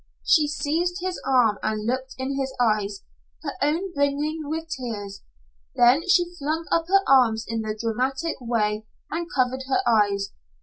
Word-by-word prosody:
She 310 Hz, -4 st, +5 dB
seized 320 Hz, +4 st, -1 dB
his 370 Hz, 0 st, -3 dB
arm 240 Hz, -6 st, +3 dB
and 215 Hz, 0 st, -2 dB
looked 260 Hz, +2 st, -2 dB
in 265 Hz, +1 st, -3 dB
his 265 Hz, -1 st, -3 dB
eyes, 210 Hz, -4 st, +1 dB, 0.4 s
her 285 Hz, -, -2 dB
own 335 Hz, +6 st, 0 dB
brimming 290 Hz, +2 st, 0 dB
with 320 Hz, +1 st, -3 dB
tears. 215 Hz, -8 st, -5 dB, 0.5 s
Then 255 Hz, +8 st, +4 dB
she 350 Hz, -1 st, +3 dB
flung 310 Hz, +3 st, -2 dB
up 330 Hz, 0 st, +2 dB
her 390 Hz, +1 st, +3 dB
arms 230 Hz, -4 st, +4 dB
in 225 Hz, -1 st, -2 dB
her 215 Hz, 0 st, -3 dB
dramatic 260 Hz, +8 st, -1 dB
way, 215 Hz, -3 st, -1 dB, 0.2 s
and 335 Hz, +1 st, -2 dB
covered 260 Hz, 0 st, +1 dB
her 275 Hz, +8 st, +2 dB
eyes. 200 Hz, -3 st, +2 dB
265 Hz, 160 wpm, -24 LUFS, 225-315 Hz, 0.5 s, She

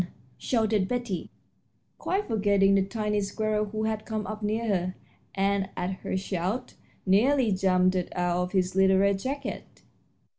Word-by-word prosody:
shouted 220 Hz, -5 st, +1 dB
Betty, 240 Hz, -7 st, -3 dB, 0.7 s
quite 395 Hz, +2 st, -1 dB
forgetting 200 Hz, -3 st, +3 dB
the 195 Hz, -, +4 dB
tiny 210 Hz, +1 st, -1 dB
squirrel 215 Hz, +1 st, -1 dB
who 215 Hz, +1 st, -4 dB
had 220 Hz, -1 st, -1 dB
come 215 Hz, -2 st, -3 dB
up 215 Hz, +2 st, -6 dB
near 215 Hz, +2 st, -1 dB
her, 185 Hz, -3 st, 0 dB, 0.4 s
and, 195 Hz, 0 st, +1 dB
at 180 Hz, 0 st, -1 dB
her -, -, -2 dB
shout, 195 Hz, +6 st, -3 dB, 0.3 s
nearly 235 Hz, +5 st, +3 dB
jumped 185 Hz, -1 st, +3 dB
out 180 Hz, -1 st, -1 dB, 0.3 s
of 180 Hz, 0 st, -1 dB
his 185 Hz, -2 st, 0 dB
little 190 Hz, 0 st, +5 dB
red 200 Hz, 0 st, +3 dB
jacket. 275 Hz, +6 st, -5 dB
200 Hz, 145 wpm, -27 LUFS, 190-220 Hz, 0.7 s, little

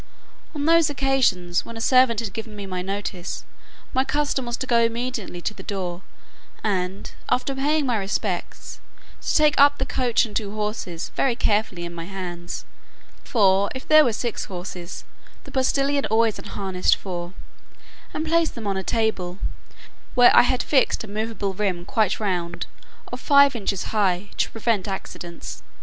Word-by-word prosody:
On 290 Hz, -1 st, -2 dB
those 330 Hz, -1 st, +5 dB
occasions, 265 Hz, -11 st, +1 dB
when 230 Hz, -, -9 dB
a -, -, -5 dB
servant 255 Hz, -1 st, +4 dB
had 205 Hz, -5 st, -5 dB
given 225 Hz, -1 st, -6 dB
me 200 Hz, -1 st, -6 dB
notice, 190 Hz, 0 st, -4 dB, 0.5 s
my 260 Hz, -, +3 dB
custom 285 Hz, -3 st, -1 dB
was 240 Hz, -, -2 dB
to -, -, -3 dB
go 235 Hz, -2 st, +3 dB
immediately 230 Hz, -5 st, -1 dB
to 215 Hz, -, -2 dB
the -, -, -10 dB
door, 185 Hz, -3 st, -4 dB, 0.6 s
and, 190 Hz, -2 st, -2 dB, 0.2 s
after 250 Hz, +2 st, +1 dB
paying 290 Hz, +2 st, +1 dB
my 245 Hz, -3 st, +1 dB
respects, 195 Hz, -2 st, -3 dB, 0.4 s
to -, -, -1 dB
take 300 Hz, -1 st, +5 dB
up 285 Hz, 0 st, +6 dB
the 265 Hz, -, -1 dB
coach 250 Hz, -4 st, +1 dB
and 210 Hz, -, -10 dB
two 210 Hz, -2 st, -2 dB
horses 210 Hz, -5 st, -4 dB
very 260 Hz, -3 st, +2 dB
carefully 205 Hz, -6 st, 0 dB
in 170 Hz, -, -7 dB
my 165 Hz, -1 st, -6 dB
hands 175 Hz, -2 st, -6 dB, 0.6 s
(for, 200 Hz, -4 st, +3 dB
if 260 Hz, -, -7 dB
there 310 Hz, 0 st, +8 dB
were 245 Hz, -, +2 dB
six 230 Hz, +1 st, -3 dB
horses, 180 Hz, -2 st, -7 dB, 0.4 s
the 275 Hz, -, -12 dB
postillion 275 Hz, +1 st, +1 dB
always 225 Hz, -1 st, +2 dB
unharnessed 190 Hz, -2 st, 0 dB
four,) 175 Hz, -2 st, -6 dB, 0.8 s
and 310 Hz, -, -3 dB
place 330 Hz, 0 st, +3 dB
them 230 Hz, -3 st, -8 dB
on 195 Hz, -1 st, 0 dB
a -, -, -1 dB
table, 190 Hz, -5 st, -1 dB, 0.8 s
where 245 Hz, -1 st, +7 dB
I -, -, +10 dB
had 245 Hz, +1 st, +1 dB
fixed 270 Hz, -5 st, +2 dB
a -, -, -8 dB
movable 210 Hz, -1 st, -3 dB
rim 185 Hz, -3 st, -1 dB
quite 215 Hz, -5 st, +1 dB
round, 175 Hz, -5 st, -2 dB, 0.5 s
of -, -, -4 dB
five 280 Hz, -2 st, +5 dB
inches 195 Hz, -4 st, -1 dB
high, 195 Hz, -2 st, +1 dB
to -, -, +1 dB
prevent 225 Hz, -3 st, -1 dB
accidents. 175 Hz, -3 st, -6 dB
215 Hz, 165 wpm, -24 LUFS, 190-255 Hz, 0.8 s, I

